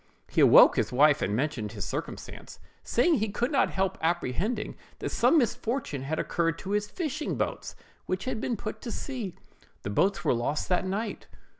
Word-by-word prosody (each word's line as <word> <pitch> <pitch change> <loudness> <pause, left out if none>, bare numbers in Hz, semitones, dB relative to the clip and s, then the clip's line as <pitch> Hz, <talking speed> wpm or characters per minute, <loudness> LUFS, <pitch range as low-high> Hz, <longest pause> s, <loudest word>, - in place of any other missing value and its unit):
He - - +3
awoke - - +8
his - - +1
wife 145 +3 +4
and 100 - 0
mentioned 125 -4 -1
the 105 0 -10
circumstance, - - -6 0.2
saying 275 +4 +2
he 215 +1 -1
could 240 +6 -1
not 280 - +3
help 190 0 -1
apprehending 175 - -1 0.2
that - - -4
some 330 - +4
misfortune 240 - -1
had 150 +4 -3
occurred 165 -1 0
to 190 - -6
his 210 0 0
fishing 305 - -3
boats, - - -3 0.3
which 185 +1 -2
had 240 -2 -2
put 215 +1 -6
to - - -6
sea. 235 -10 -5 0.5
The 100 - -3
boats 195 - +1
were - - +4
lost 120 +5 -2
that 185 +1 +1
night. 210 +3 -3
195 Hz, 175 wpm, -28 LUFS, 155-235 Hz, 0.5 s, awoke